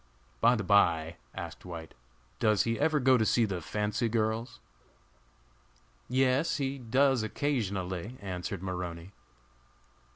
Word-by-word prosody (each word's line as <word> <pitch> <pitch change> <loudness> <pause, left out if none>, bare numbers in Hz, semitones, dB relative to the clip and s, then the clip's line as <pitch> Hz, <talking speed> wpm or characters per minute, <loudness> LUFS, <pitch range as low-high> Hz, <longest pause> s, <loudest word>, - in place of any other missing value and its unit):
"By 120 +2 +5
the 110 - -2
by," 85 -4 +3 0.2
asked - - -7
White, 85 -3 -8 0.5
"does 105 -2 +3
he 115 0 -1
ever 155 -2 +2
go 130 -1 +4
to - - +3
see 115 +1 +3
the 95 -4 -3
fancy 105 +6 -1
girls?" 115 +1 -1 1.5
"Yes, 130 +4 +2
he 135 -1 -2
does, 130 +1 +2
occasionally," 105 -4 -2
answered 95 -1 -5
Maroney. 90 -1 -5
110 Hz, 120 wpm, -30 LUFS, 95-125 Hz, 1.5 s, By